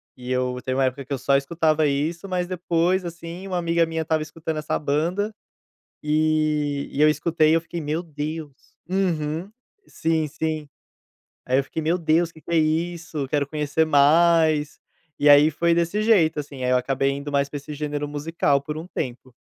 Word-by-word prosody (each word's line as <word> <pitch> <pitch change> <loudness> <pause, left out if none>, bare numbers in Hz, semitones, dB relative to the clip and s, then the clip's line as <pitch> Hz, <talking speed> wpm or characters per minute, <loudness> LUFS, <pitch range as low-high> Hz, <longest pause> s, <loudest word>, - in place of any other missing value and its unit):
E 125 0 -7
eu 125 0 -1
teve 130 - -2
uma 135 - +3
época 130 +2 -2
que - - -20
eu - - -1
só 135 +2 +2
escutava 155 +2 +2
isso, 160 +7 -2
mas 180 -1 -1
depois, 180 +1 0
assim, 170 +2 -7
uma 185 -2 -2
amiga 170 -1 +2
minha 160 0 -3
estava 160 -1 0
escutando 160 0 -5
essa 155 - -1
banda, 170 +9 -1 0.7
e 150 -2 +1
e 145 - -1
eu 155 - +7
escutei, 155 +1 +2
eu 165 - +2
fiquei: 170 +1 -6
meu 155 +3 -2
Deus. 155 -1 -5 0.4
Uhum. 170 -2 -1 0.4
Sim, 160 -1 0
sim. 155 0 -3 0.8
Aí 130 +1 +2
eu 140 - +2
fiquei: 160 - -5
meu 165 +3 +1
Deus, 165 0 +1
que 160 - -16
que 170 - -9
é 165 - +3
isso, 160 -1 -1
quero 145 -2 0
conhecer 150 +1 0
mais. 155 +1 +4 0.4
E 145 - +4
aí 145 +2 +8
foi 170 +2 +1
desse 170 +5 0
jeito, 180 -9 +3
assim, 140 -3 -9
aí 125 - +1
eu - - +4
acabei 135 +2 0
indo 140 +1 -5
mais 140 0 +1
pra 145 - -10
esse 145 +2 -8
gênero 150 0 -3
musical 145 -1 0
por 150 +2 -5
um 160 - -6
tempo. 130 -5 -5
155 Hz, 190 wpm, -23 LUFS, 145-170 Hz, 0.8 s, aí